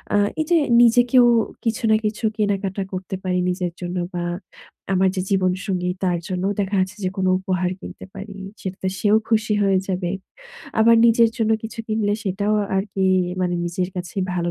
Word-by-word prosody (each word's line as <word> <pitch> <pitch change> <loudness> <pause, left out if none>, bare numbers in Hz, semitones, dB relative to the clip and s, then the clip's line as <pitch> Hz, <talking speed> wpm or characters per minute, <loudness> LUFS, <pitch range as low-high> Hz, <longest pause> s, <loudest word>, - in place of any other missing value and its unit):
আ - - +5 0.2
এইযে 335 +2 +2 0.2
নিজেকেও 245 +1 +5 0.4
কিছু 230 +1 -1
না - - +6
কিছু 210 +2 -3
কেনাকাটা 200 -2 -1
করতে 185 +1 -4
পারি 180 -1 0
নিজের 180 -1 -2
জন্য 180 +1 -4 0.2
বা 175 -1 -2 0.7
আমার 190 0 +3
যে 185 - 0
জীবনসঙ্গী 185 -1 0
তার 180 -2 +1
জন্যও 190 +1 -1
দেখা 200 +1 0
যাচ্ছে 190 +3 -1
যে 185 - +1
কোনো 185 -1 +1
উপহার 185 -1 -1
কিনতে - - -9
পারি। 200 +1 -8 0.3
সেটাতে 190 0 -4
সেও 210 0 +4
খুশি 215 -1 +2
হয়ে 195 -1 +3
যাবে, 180 -2 -1 0.7
আবার 230 +1 +6
নিজের 230 0 +5
জন্য 225 -2 +1
কিছু 225 +1 -8
কিনলে 215 -2 0
সেটাও 200 +2 0 0.2
আরকি 195 0 -1 0.4
মানে 180 -1 0
নিজের 175 +1 -2
কাছেই 180 +2 -3
ভালো 175 -1 -1
195 Hz, 165 wpm, -22 LUFS, 185-215 Hz, 0.7 s, না